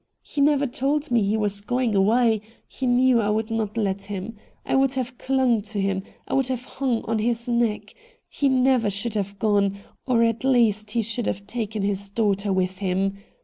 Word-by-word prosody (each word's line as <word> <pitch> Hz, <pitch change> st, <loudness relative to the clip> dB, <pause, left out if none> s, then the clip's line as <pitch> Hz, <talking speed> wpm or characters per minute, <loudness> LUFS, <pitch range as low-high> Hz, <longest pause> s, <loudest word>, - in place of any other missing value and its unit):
He 290 Hz, -, -3 dB
never 285 Hz, 0 st, +3 dB
told 285 Hz, +3 st, -1 dB
me 235 Hz, -2 st, +4 dB
he 205 Hz, +2 st, +1 dB
was 205 Hz, -2 st, 0 dB
going 245 Hz, +2 st, 0 dB
away 220 Hz, +2 st, +3 dB
— -, -, -34 dB
he 260 Hz, -, -4 dB
knew 245 Hz, -1 st, +4 dB
I 205 Hz, -, 0 dB
would 220 Hz, +1 st, -1 dB
not 220 Hz, -1 st, -2 dB
let 200 Hz, -3 st, 0 dB
him 200 Hz, +2 st, -6 dB, 0.2 s
— -, -, -38 dB
I -, -, -2 dB
would 270 Hz, 0 st, +3 dB
have 255 Hz, -1 st, -4 dB
clung 260 Hz, -4 st, +2 dB
to 210 Hz, 0 st, -4 dB
him 195 Hz, -1 st, 0 dB
— -, -, -35 dB
I -, -, -4 dB
would 270 Hz, -1 st, +2 dB
have 255 Hz, -1 st, -3 dB
hung 260 Hz, -5 st, -2 dB
on 225 Hz, 0 st, -1 dB
his 235 Hz, +2 st, 0 dB
neck 235 Hz, -3 st, 0 dB, 0.2 s
— -, -, -36 dB
he 280 Hz, -, 0 dB
never 255 Hz, -4 st, +3 dB
should 205 Hz, +3 st, -2 dB
have 200 Hz, -1 st, -3 dB
gone, 200 Hz, -2 st, +1 dB, 0.3 s
or 235 Hz, -3 st, +3 dB
at 230 Hz, 0 st, 0 dB
least 225 Hz, -5 st, +2 dB
he 230 Hz, +2 st, 0 dB
should 230 Hz, +2 st, -2 dB
have 200 Hz, +1 st, -3 dB
taken 220 Hz, -2 st, -3 dB
his 200 Hz, 0 st, -1 dB
daughter 200 Hz, -1 st, 0 dB
with 185 Hz, 0 st, -1 dB
him 195 Hz, 0 st, 0 dB
225 Hz, 215 wpm, -24 LUFS, 200-250 Hz, 0.3 s, me